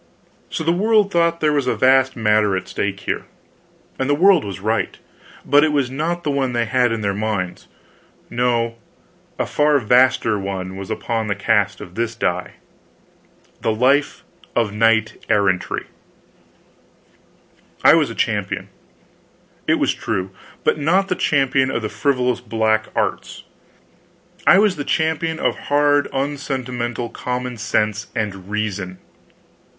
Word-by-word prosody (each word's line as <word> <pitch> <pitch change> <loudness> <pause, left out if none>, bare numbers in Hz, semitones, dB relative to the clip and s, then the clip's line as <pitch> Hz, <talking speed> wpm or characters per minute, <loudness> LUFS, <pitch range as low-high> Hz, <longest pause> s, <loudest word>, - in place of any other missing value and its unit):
So - - -3
the 165 - +2
world 210 +2 +3
thought 170 -1 +1
there 150 -1 +2
was 140 -3 0
a - - +1
vast 130 0 +3
matter 105 -3 +2
at - - -6
stake 100 -1 -3
here, - - -3 0.7
and 130 +1 -1
the 145 - +4
world 185 0 +5
was 100 -1 -6
right, 110 +3 -1 0.5
but 145 +1 +5
it 155 - +2
was 140 -4 0
not 165 +5 -2
the 145 - 0
one 135 -3 0
they 120 -1 +1
had 125 0 +2
in 115 -1 -2
their 100 -1 0
minds. 100 -3 -3 0.6
No, 120 -1 0 0.6
a - - 0
far 150 0 +2
vaster 125 -3 +3
one 95 -1 -4
was 95 -1 -7
upon 115 -2 -2
the 100 - -1
cast 105 -1 +1
of 90 - -10
this 115 +2 -2
die: 90 -5 -2 1.1
the 110 - +1
life 135 +6 +1 0.3
of 115 -4 +1
knight 110 0 +2
errantry. 95 -3 +1 2.0
I - - +8
was - - +3
a - - -7
champion, - - -2 1.0
it - - +4
was - - +1
true, 95 -4 -3 0.3
but - - +1
not 185 +6 +2
the 180 - +1
champion 135 -4 +2
of 120 -3 -2
the 110 - -2
frivolous 125 +3 0
black 110 -1 0
arts, - - -2 1.0
I 180 - +8
was 205 -3 +3
the 145 - -3
champion 160 +1 0
of - - 0
hard 145 0 +3
unsentimental 130 -4 -3
common 125 +1 -4
sense 105 -1 -1
and 100 -4 -4
reason. 100 -3 -3
120 Hz, 145 wpm, -20 LUFS, 105-145 Hz, 2.0 s, I